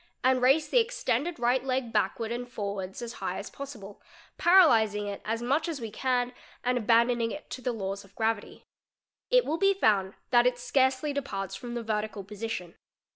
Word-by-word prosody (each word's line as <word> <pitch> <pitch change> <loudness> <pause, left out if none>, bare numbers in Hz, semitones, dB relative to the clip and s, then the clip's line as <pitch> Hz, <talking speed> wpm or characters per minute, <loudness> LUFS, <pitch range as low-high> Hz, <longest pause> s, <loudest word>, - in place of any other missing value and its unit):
and 255 0 +3
raise 275 +5 +4
the - - +4
extended 460 -8 -1
right 245 +1 +2
leg 255 -3 -2
backward 220 +2 0
and 245 +1 -3
_| - - -23
forwards 200 -2 -5
as 235 0 -6
high - - -2
as - - -7
possible, 225 -8 -9 0.2
" - - -26
paralysing'"' 225 - +5
it 200 -1 -5
as 225 +2 -2
much 285 +7 +1
as 315 -4 -4
we 225 -3 -6
can 250 +1 0 0.3
and 250 +1 +1
abandoning 235 +1 +3
it 295 - -8
to 255 - -5
the 250 - -1
laws 195 -3 -4
of 195 0 -21
gravity; 220 -2 -2 0.7
it - - +4
will 320 +3 -1
be 395 0 +4
found 200 - +2 0.2
that 240 0 +6
it 250 -1 +1
scarcely 260 +3 +1
departs 200 -10 -4
from 240 -1 -7
the 235 - -3
vertical 215 -2 -2
position. 200 -3 -5
240 Hz, 190 wpm, -28 LUFS, 210-265 Hz, 0.7 s, that